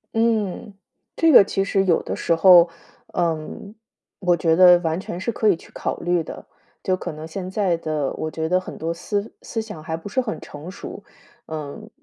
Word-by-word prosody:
嗯， 220 -3 0 0.4
这 330 -1 +4
个 250 - +9
其 195 0 -1
实 195 0 +1
有 175 -3 +2
的 - - -4
时 165 - +1
候， 175 0 +7 0.5
嗯， 170 +3 -2 0.5
我 180 -3 +2
觉 160 0 +2
得 180 0 +8
完 165 0 -1
全 175 -2 -6
是 185 - -2
可 215 -1 +2
以 190 - +4
去 - - -17
考 - - -3
虑 175 0 +1
的， 160 - -9 0.4
就 185 - +1
可 185 - -5
能 155 +1 -8
现 185 +3 -6
在 190 -3 0
的 155 -4 -2
我 155 - -4
觉 160 0 -3
得 180 +2 +2
很 185 - -9
多 165 +1 -2
思 200 +5 -3
思 225 - -4
想 215 -7 -6
还 160 +1 -3
不 165 - -9
是 260 +6 0
很 230 -4 -4
成 150 +4 -10
熟。 200 +1 -9 0.4
嗯， 155 +7 -7
180 Hz, 215 characters per minute, -22 LUFS, 160-200 Hz, 0.5 s, 个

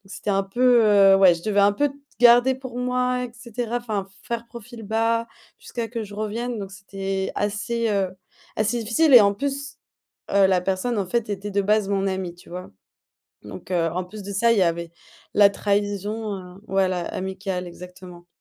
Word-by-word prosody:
c'était - - -5
un 195 0 +1
peu, 240 +4 +3
heu, 200 -2 +6
ouais, 185 -3 +6
je 170 - -11
devais 205 -2 +1
un 200 0 +4
peu 290 +7 +1
t 275 - -14 0.2
garder 245 +2 +6
pour 260 -2 -8
moi 250 0 0
et 245 - -9
cetera, 240 -1 -4
enfin, 215 -5 -3 0.2
faire 235 0 -4
profil 235 0 -11
bas 225 +2 0 0.3
jusqu'à 230 -2 -5
que 230 -1 -4
je 205 0 -10
revienne 225 +3 -3
donc 195 -1 -7
c'était 195 -1 -4
assez, 215 +3 -1
heu, 195 -2 +1 0.5
assez 220 +3 0
difficile 265 +7 +2
et 245 - +12
en 200 0 +3
plus, 280 +4 -4 0.6
heu, 200 -1 +5
la 185 -1 +2
personne, 195 +5 -1
en 195 - -1
fait, 235 +2 -1
était 205 +1 -4
de 200 0 +1
base 210 0 +2
mon 195 -1 0
amie, 190 -2 -3
tu 175 - -18
vois? 180 +1 -7 0.7
Donc, - - -11
heu, 170 -2 +1
en 180 - -2
plus 210 +3 -10
de 200 - -6
ça, 230 +4 +2
il 230 - +2
y 190 - +4
avait 170 -1 -1 0.4
la 205 -1 +6
trahison, 205 +1 -2
heu, 180 +1 -11
voilà, 190 -2 +1
amicale, 190 -1 -4
exactement. 180 0 -12
205 Hz, 190 wpm, -23 LUFS, 190-235 Hz, 0.7 s, et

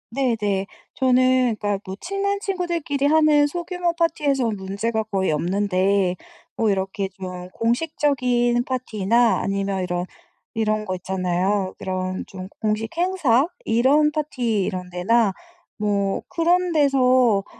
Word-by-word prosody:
네네. 215 -7 0 0.3
저는 255 -2 +3
그러니까 205 -1 -2
뭐 190 -1 -6
친한 395 +2 -1
친구들끼리 345 -8 -2
하는 300 -1 +4
소규모 350 +2 -2
파티에선 280 -9 +1
문제가 200 +4 -2
거의 195 -5 -1
없는데 185 +2 +1 0.4
뭐 225 - +2
이렇게 195 0 -1
좀 185 -1 -7
공식적인 245 -1 +1
파티나 235 -2 +1
아니면 195 -1 -1
이런 175 0 -2 0.5
이런 215 -1 0
거 185 -3 -3
있잖아요. 185 +1 -1
이런 185 0 -3
좀 185 0 -8
공식 215 +1 -1
행사 335 -8 +2 0.2
이런 275 +7 +3
파티 250 -9 -1
이런 185 -2 -4
데나 195 +5 +2 0.5
뭐 200 -2 0
그런 350 +1 +1
데서 255 -8 +3
225 Hz, 265 characters per minute, -22 LUFS, 195-280 Hz, 0.5 s, 하는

